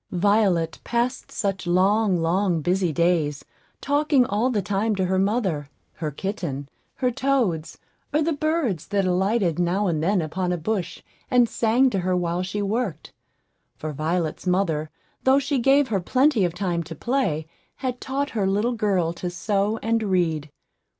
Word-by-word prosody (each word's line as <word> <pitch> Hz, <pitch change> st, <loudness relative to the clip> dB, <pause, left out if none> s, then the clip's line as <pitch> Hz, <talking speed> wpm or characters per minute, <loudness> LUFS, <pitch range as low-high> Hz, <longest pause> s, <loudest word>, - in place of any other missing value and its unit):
Violet 185 Hz, -3 st, +2 dB
passed 240 Hz, +2 st, -1 dB
such 195 Hz, -3 st, -2 dB
long, 190 Hz, +2 st, +3 dB
long, 170 Hz, +1 st, +1 dB
busy 180 Hz, +1 st, +1 dB
days, 160 Hz, -3 st, +1 dB, 0.4 s
talking 285 Hz, -2 st, +3 dB
all 220 Hz, +3 st, +1 dB
the 230 Hz, -5 st, 0 dB
time 205 Hz, +3 st, 0 dB
to 190 Hz, -1 st, 0 dB
her 185 Hz, +1 st, +1 dB
mother, 190 Hz, -, 0 dB, 0.2 s
her 155 Hz, -2 st, -4 dB
kitten, 150 Hz, -4 st, -4 dB, 0.3 s
her 250 Hz, -2 st, 0 dB
toads, 235 Hz, -, 0 dB, 0.3 s
or 300 Hz, +1 st, +2 dB
the 330 Hz, +1 st, +1 dB
birds 290 Hz, -, -1 dB
that 200 Hz, -1 st, 0 dB
alighted 185 Hz, -1 st, +1 dB
now 180 Hz, +4 st, +1 dB
and 165 Hz, -5 st, 0 dB
then 190 Hz, +4 st, +2 dB
upon 175 Hz, +3 st, -2 dB
a 180 Hz, -, 0 dB
bush, 180 Hz, +1 st, -3 dB, 0.3 s
and 245 Hz, -2 st, +4 dB
sang 240 Hz, +4 st, +2 dB
to 195 Hz, -, 0 dB
her 180 Hz, 0 st, 0 dB
while 175 Hz, 0 st, -1 dB
she 195 Hz, +3 st, -3 dB
worked; 200 Hz, -, -3 dB, 0.6 s
for 155 Hz, -1 st, -5 dB
Violet's 160 Hz, +4 st, -2 dB
mother, 165 Hz, -5 st, +1 dB, 0.3 s
though 265 Hz, +1 st, +5 dB
she 280 Hz, 0 st, 0 dB
gave 270 Hz, +3 st, +4 dB
her 200 Hz, -3 st, +1 dB
plenty 255 Hz, -, +3 dB
of 175 Hz, -1 st, -3 dB
time 180 Hz, -3 st, -1 dB
to 165 Hz, 0 st, -8 dB
play, 230 Hz, -, -1 dB, 0.3 s
had 255 Hz, -2 st, -4 dB
taught 280 Hz, +2 st, -2 dB
her 205 Hz, -4 st, 0 dB
little 210 Hz, +5 st, +1 dB
girl 195 Hz, -7 st, 0 dB
to 180 Hz, +1 st, -4 dB
sew 200 Hz, +4 st, 0 dB
and 225 Hz, 0 st, +1 dB
read. 170 Hz, -7 st, 0 dB
195 Hz, 165 wpm, -24 LUFS, 175-235 Hz, 0.6 s, though